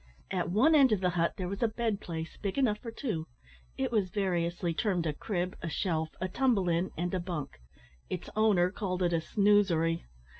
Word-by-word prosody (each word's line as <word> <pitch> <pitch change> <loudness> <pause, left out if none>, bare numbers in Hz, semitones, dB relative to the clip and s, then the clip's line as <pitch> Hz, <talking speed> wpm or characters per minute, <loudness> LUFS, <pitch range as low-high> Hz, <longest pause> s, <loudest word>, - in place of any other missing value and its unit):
At 180 -2 -1
one 225 - +4
end 275 -5 +6
of 215 - +3
the 180 -1 +1
hut 170 -1 +1
there 185 -3 -3
was 200 +2 -5
a 235 - +4
bed 220 -2 -2
place, 165 -1 -5
big 200 +2 -2
enough 225 -6 +2
for 230 - -7
two; 210 - -3 0.5
it 135 - -1
was 205 -5 +1
variously 175 -3 -1
termed 180 -1 0
a 155 - 0
crib, 180 +3 -3
a 170 - -3
shelf, 160 -2 -1
a 185 - -1
tumble 210 -3 +2
in, 170 +2 +1
and 175 +2 -2
a 185 - +1
bunk. 170 - -5 0.5
Its 180 - -4
owner 200 -5 +4
called 185 -3 -2
it 175 -1 +2
a 165 - +2
"snoosery." 180 -4 +2
185 Hz, 200 wpm, -30 LUFS, 170-210 Hz, 0.5 s, end